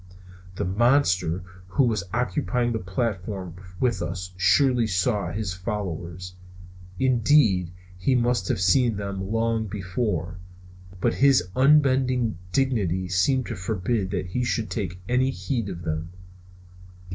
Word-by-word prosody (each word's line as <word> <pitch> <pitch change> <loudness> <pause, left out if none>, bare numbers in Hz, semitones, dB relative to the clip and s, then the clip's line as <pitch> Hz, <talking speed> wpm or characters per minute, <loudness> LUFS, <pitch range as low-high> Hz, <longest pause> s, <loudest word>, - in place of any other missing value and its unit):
The - - -2
monster 95 - +2 0.2
who 90 +9 +2
was 110 -6 +1
occupying 125 0 0
the 110 - -1
platform 95 -2 -3 0.3
with 125 -2 +1
us 90 +2 -5
surely 115 +6 +3
saw 100 -1 0
his 105 -4 -3
followers; 90 -3 -5 0.6
indeed, 115 - +3 0.3
he 130 +8 +2
must 120 -5 +1
have - - 0
seen 110 +5 +3
them 100 -1 -4
long 115 -1 0
before; 90 -3 -3 0.6
but - - +1
his 135 -10 +4
unbending 130 -6 +3
dignity 100 -9 0
seemed 125 +8 +2
to - - -5
forbid 95 +2 -2
that 95 - -2
he 125 +8 -2
should 115 -2 -1
take 90 -5 -3
any 125 +3 +2
heed 125 -5 -3
of 85 -2 -7
them. 80 0 -3
105 Hz, 125 wpm, -25 LUFS, 90-125 Hz, 0.6 s, his